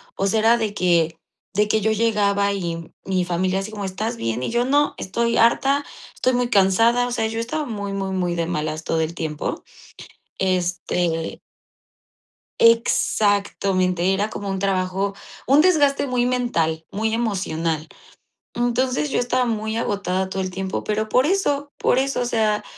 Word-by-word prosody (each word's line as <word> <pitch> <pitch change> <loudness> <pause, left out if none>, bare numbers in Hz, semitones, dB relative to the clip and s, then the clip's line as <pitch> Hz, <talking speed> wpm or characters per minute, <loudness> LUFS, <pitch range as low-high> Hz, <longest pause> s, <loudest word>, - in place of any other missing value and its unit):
o 195 - 0
sea, 220 +3 +2
era 230 +2 +4
de 215 -3 -2
que 170 -4 +2 0.4
de 210 +1 +2
que 215 0 +1
yo 220 +2 +2
llegaba, 200 -2 +1
y 170 -3 -4
mi 185 -2 0
familia 185 +2 0
así 205 +3 -5
como: 205 -2 -6
"¿Estás 215 +5 -3
bien?". 115 - -2
Y - - -2
yo: 240 +1 +2
"No, 290 +2 +2
estoy 235 +5 -1
harta, 275 +5 +3 0.3
estoy 255 - +1
muy 245 0 0
cansada". 230 +4 +3
O - - -5
sea, 225 -2 0
yo 225 +1 -4
estaba 300 +6 -3
muy, 205 -3 -4
muy, 195 -1 -3
muy 180 -2 -1
de 170 -1 -1
malas 155 -1 -3
todo 160 0 0
el 160 +1 -2
tiempo. 155 -3 -3 0.8
Este 175 -2 -1 1.2
Exactamente, 200 -5 +2
era 205 +3 0
como 200 -2 -5
un 190 -1 -2
trabajo, 195 0 0 0.3
un 280 +3 +6
desgaste 290 -6 +3
muy 245 -1 +1
mental, 165 -11 0
muy 220 +2 -1
emocional. 170 -8 -1 0.7
Entonces, 250 +4 0
yo - - 0
estaba 250 +1 +1
muy 220 -1 -2
agotada 190 -3 -1
todo 190 0 -3
el 185 - -2
tiempo, 190 +1 -4
pero 215 0 -1
por 255 +5 +3
eso, 290 -6 0
por 255 - +2
eso, 270 -1 0
o - - 0
sea, 215 -3 +1
205 Hz, 165 wpm, -22 LUFS, 185-235 Hz, 1.2 s, un